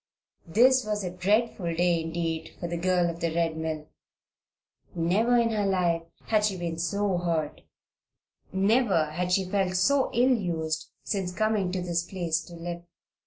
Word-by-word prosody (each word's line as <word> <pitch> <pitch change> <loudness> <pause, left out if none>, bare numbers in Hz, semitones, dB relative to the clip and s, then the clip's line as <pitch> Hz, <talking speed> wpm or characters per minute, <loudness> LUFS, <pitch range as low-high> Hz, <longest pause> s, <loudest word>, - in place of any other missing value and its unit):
This 255 +8 +5
was 210 -1 -2
a 180 - -3
dreadful 195 -2 +1
day 175 -1 +2
indeed 165 0 -3
for 175 - -3
the 170 - -3
girl 180 0 +2
of 170 0 -4
the 170 -1 -1
Red 165 -1 +1
Mill. 160 -1 -4 1.1
Never 200 +9 +2
in 230 -1 +2
her 210 -2 0
life 175 -3 +1 0.2
had 215 -1 +1
she 205 -3 +1
been 170 -2 -4
so 190 +2 0
hurt 165 -4 -2 0.9
never 195 -5 +2
had 180 +3 -2
she 190 +1 +2
felt 190 0 0
herself 225 +10 +2
so - - +2
ill 255 +1 +5
used 160 -6 -2
since 195 -4 -2
coming 210 -1 0
to 185 -1 -2
this 170 -1 0
place 170 -2 -2
to 175 - -11
live. 170 0 -6
180 Hz, 165 wpm, -27 LUFS, 170-205 Hz, 1.1 s, This